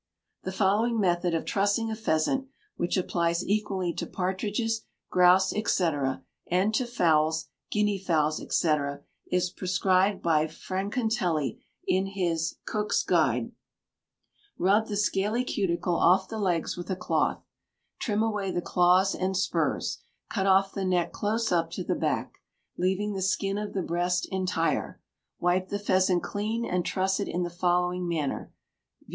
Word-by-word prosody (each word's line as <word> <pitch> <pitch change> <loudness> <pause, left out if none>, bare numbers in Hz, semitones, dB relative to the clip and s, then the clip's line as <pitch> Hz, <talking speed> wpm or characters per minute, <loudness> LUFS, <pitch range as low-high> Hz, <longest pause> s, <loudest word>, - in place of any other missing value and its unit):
The 190 - -4
following 210 +4 +2
method 175 -3 +1
of 165 - -2
trussing 205 +3 +1
a - - -2
pheasant 220 +6 0 0.3
which 175 - -1
applies 170 -2 0
equally 195 -4 0
to - - -4
partridges, 205 +5 -1 0.3
grouse, 180 +1 +5
&c., 200 -5 +1 0.6
and 185 +5 +2
to 245 +3 +1
fowls, 160 -8 +2 0.2
guineafowls, 185 -7 +1
&c. 160 -3 +3 0.5
is 180 0 0
prescribed 185 +1 +1
by 160 -2 +3
Francatelli 185 - -2 0.2
in 190 +1 +1
his 170 -4 -1
"Cook's 210 -1 0
Guide": 130 -9 +1 1.1
"Rub 205 +5 +3
the 205 - -3
scaly 210 +4 +1
cuticle 180 -6 0
off 190 +2 +4
the 220 +2 -5
legs 180 -5 0
with 175 +1 -7
a 190 - 0
cloth; 180 - 0 0.6
trim 215 -1 0
away 210 -3 -1
the 175 - -1
claws 180 +2 +3
and 185 0 -1
spurs; 190 - 0 0.3
cut 195 -2 0
off 195 0 +4
the 195 - -3
neck 180 -2 +1
close 220 +2 -1
up 165 -2 +2
to - - -3
the - - 0
back, - - -2 0.4
leaving 190 +3 0
the 190 - -3
skin 195 +1 0
of 210 0 -5
the 190 - -1
breast 175 +2 0
entire; 185 -3 -1 0.4
wipe 185 +1 +1
the 205 - -1
pheasant 185 -3 +2
clean 220 +3 -2
and 180 -4 -1
truss 190 +1 0
it 200 - -2
in 180 - -1
the 175 - -4
following 180 0 0
manner, 155 -5 -2 0.5
viz. - - -23
185 Hz, 145 wpm, -27 LUFS, 175-205 Hz, 1.1 s, grouse